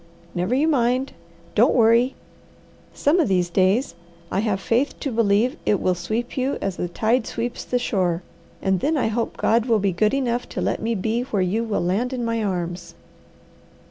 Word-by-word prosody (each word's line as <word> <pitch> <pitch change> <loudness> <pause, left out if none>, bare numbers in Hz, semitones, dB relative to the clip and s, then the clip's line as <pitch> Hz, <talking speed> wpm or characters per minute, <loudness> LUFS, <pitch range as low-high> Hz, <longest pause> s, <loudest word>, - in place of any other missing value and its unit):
Never 180 +8 0
you 295 +4 +2
mind! 255 -2 +1 0.4
Don't 230 +4 +4
worry! 235 +2 +4 0.8
Some 305 +6 +2
of 320 - +3
these 180 -3 +1
days 190 +5 +2 0.4
I 190 - 0
have 205 -2 0
faith 240 +8 0
to 275 - -2
believe 230 +4 +2
it 205 - +2
will 185 - +1
sweep 220 +7 -3
you 265 +1 0
as 195 -2 -3
a 180 - -1
tide 225 +6 0
sweeps 240 +1 -4
the 250 - -1
shore, 185 -7 0 0.4
and 190 -1 +2
then 305 - +1
I 250 - +1
hope 225 +1 -2
God 230 +1 +2
will 230 -2 +4
be 200 -1 +1
good 210 +8 +1
enough 245 -3 -1
to - - -5
let - - -1
me 230 +1 -1
be 220 +4 -1
where 210 -7 -1
you 205 +6 0
will 220 -5 -1
land 225 +9 0
in 245 -2 -2
my 230 -1 -1
arms." 175 -3 -3
225 Hz, 190 wpm, -23 LUFS, 190-245 Hz, 0.8 s, Don't